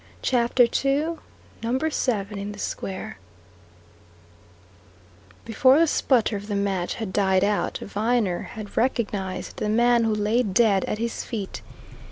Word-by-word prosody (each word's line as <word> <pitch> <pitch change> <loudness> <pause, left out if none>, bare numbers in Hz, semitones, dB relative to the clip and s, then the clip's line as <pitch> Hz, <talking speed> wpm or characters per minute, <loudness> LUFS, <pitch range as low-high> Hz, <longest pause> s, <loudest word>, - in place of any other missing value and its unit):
CHAPTER 245 0 +3
II 285 +7 0 0.4
NUMBER 260 +7 -1
SEVEN 210 -7 -1
IN 205 +1 -5
THE - - -11
SQUARE 190 - -5 2.3
Before 255 +4 +4
the 330 - +5
sputter 245 -7 +2
of 200 +1 -6
the 205 - -2
match 195 -3 -1
had 220 -5 -5
died 190 -2 +2
out, 205 0 0
Viner 210 -3 0
had 215 -3 -8
recognized 210 -6 -2
the 210 - -2
man 235 +2 +3
who 220 -1 +1
lay 210 +3 +1
dead 205 -2 +2
at - - -3
his 230 +1 -3
feet. 210 -5 -5
220 Hz, 135 wpm, -24 LUFS, 200-245 Hz, 2.3 s, the